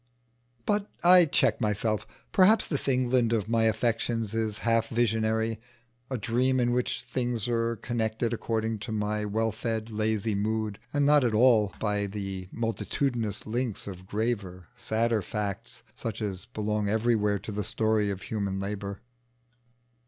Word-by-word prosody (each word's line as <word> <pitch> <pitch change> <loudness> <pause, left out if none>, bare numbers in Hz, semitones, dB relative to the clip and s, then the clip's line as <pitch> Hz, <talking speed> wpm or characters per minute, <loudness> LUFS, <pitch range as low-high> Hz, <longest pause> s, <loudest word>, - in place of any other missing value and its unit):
But 205 0 0
I 180 0 +8
check 135 -6 +2
myself. 105 0 0 0.2
Perhaps 205 +4 +5
this 145 -3 0
England 125 -3 +2
of 110 -2 0
my 115 0 +2
affections 115 0 0
is 110 -2 -1
half 115 -1 +3
visionary 110 -1 0 0.5
a 130 - -2
dream 125 +3 +1
in 120 -1 +2
which 125 0 -1
things 120 -4 -1
are 115 -1 0
connected 115 0 -1
according 110 -1 -1
to 110 - -6
my 105 0 -1
well 110 +2 0
fed, 110 0 -3
lazy 110 0 0
mood, 105 0 -1
and 145 -1 +2
not 145 -1 +5
at 115 -3 +1
all 110 -4 +4
by 105 -1 0
the 95 -2 -5
multitudinous 115 -1 -1
links 115 0 -2
of 95 -2 -8
graver, 100 -5 -3
sadder 115 -2 0
fact, 105 +5 -4
such 115 -3 -5
as 100 -4 -3
belong 105 -1 -2
everywhere 110 -2 +2
to 105 - -7
the 105 0 -2
story 110 -1 +1
of 95 -1 -4
human 100 -3 -2
labour. 100 0 -4
110 Hz, 145 wpm, -28 LUFS, 105-120 Hz, 0.5 s, I